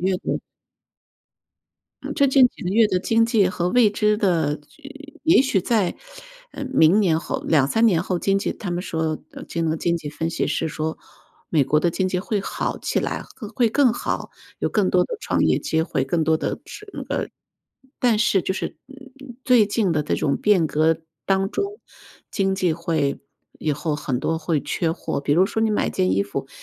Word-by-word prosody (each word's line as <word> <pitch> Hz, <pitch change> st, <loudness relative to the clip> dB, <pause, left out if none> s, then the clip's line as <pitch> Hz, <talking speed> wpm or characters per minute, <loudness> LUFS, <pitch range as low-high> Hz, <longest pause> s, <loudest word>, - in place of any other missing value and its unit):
月 190 Hz, -, +2 dB
的 -, -, -3 dB, 1.6 s
嗯， -, -, -4 dB
这 280 Hz, -, +4 dB
近 265 Hz, -1 st, +6 dB
几 -, -, -13 dB
个 180 Hz, -, -1 dB
月 220 Hz, +2 st, +5 dB
的 185 Hz, -3 st, +1 dB
经 225 Hz, +4 st, +2 dB
济 220 Hz, -5 st, +3 dB
和 175 Hz, -1 st, -1 dB
未 235 Hz, +2 st, +5 dB
知 210 Hz, +1 st, +1 dB
的 160 Hz, -7 st, +1 dB, 0.6 s
也 325 Hz, -3 st, +6 dB
许 260 Hz, -7 st, +2 dB
在， 205 Hz, -2 st, +1 dB, 0.6 s
呃， 285 Hz, -, -6 dB
明 205 Hz, -8 st, +4 dB
年 165 Hz, -6 st, +2 dB
后 -, -, -4 dB
2-3 160 Hz, +10 st, +3 dB
年 170 Hz, -6 st, +3 dB
后 180 Hz, -1 st, -2 dB
经 195 Hz, +2 st, +1 dB
济 195 Hz, -, -2 dB
他 200 Hz, -, -6 dB
们 175 Hz, +1 st, -2 dB
说 160 Hz, -3 st, -2 dB
呃， -, -, -10 dB
这 165 Hz, -, -3 dB
个 160 Hz, 0 st, 0 dB
经 170 Hz, +1 st, 0 dB
济 150 Hz, -3 st, -6 dB
分 160 Hz, +2 st, -3 dB
析 170 Hz, -, -1 dB
师 160 Hz, -, -1 dB
说， 160 Hz, 0 st, -3 dB, 0.5 s
“美 155 Hz, -4 st, +3 dB
国 140 Hz, +3 st, +2 dB
的 170 Hz, +3 st, +1 dB
经 190 Hz, -1 st, 0 dB
济 180 Hz, -1 st, -1 dB
会 205 Hz, +2 st, -2 dB
好 -, -, -3 dB
起 -, -, -1 dB
来， -, -, -2 dB, 0.3 s
会 235 Hz, -1 st, +3 dB
更 255 Hz, 0 st, +3 dB
好， -, -, -3 dB, 0.3 s
有 -, -, 0 dB
更 -, -, +1 dB
多 -, -, +3 dB
的 475 Hz, -, -5 dB
创 -, -, 0 dB
业 -, -, +3 dB
机 160 Hz, -, 0 dB
会， 140 Hz, -5 st, -1 dB
更 160 Hz, +4 st, 0 dB
多 160 Hz, 0 st, +3 dB
的 -, -, -3 dB
是 425 Hz, 0 st, -11 dB
那 -, -, -6 dB
个” -, -, -3 dB, 0.7 s
但 235 Hz, -4 st, +3 dB
是 195 Hz, -4 st, +2 dB
就 -, -, -1 dB
是， 190 Hz, -, -5 dB
嗯 275 Hz, -1 st, -14 dB, 0.2 s
嗯， 240 Hz, -, -10 dB
最 245 Hz, -4 st, +5 dB
近 205 Hz, -3 st, 0 dB
的 150 Hz, -, +1 dB
这 -, -, -1 dB
种 140 Hz, -, 0 dB
变 195 Hz, -6 st, +3 dB
革 160 Hz, +2 st, +2 dB, 0.3 s
当 195 Hz, 0 st, +2 dB
中， 405 Hz, +1 st, -3 dB, 0.5 s
经 195 Hz, -1 st, +1 dB
济 180 Hz, -3 st, +1 dB
会 160 Hz, -4 st, -1 dB, 0.4 s
以 155 Hz, -, 0 dB
后 150 Hz, +2 st, -2 dB
很 135 Hz, -4 st, -2 dB
多 160 Hz, +4 st, -1 dB
会 155 Hz, -1 st, -1 dB
缺 165 Hz, +3 st, -1 dB
货， 160 Hz, -, -3 dB
比 140 Hz, -, 0 dB
如 180 Hz, +5 st, +4 dB
说 220 Hz, +2 st, -2 dB
你 220 Hz, -, +2 dB
买 210 Hz, -, +1 dB
件 90 Hz, 0 st, 0 dB
衣 95 Hz, -, +2 dB
服， -, -, -5 dB
180 Hz, 220 characters per minute, -22 LUFS, 160-220 Hz, 1.6 s, 近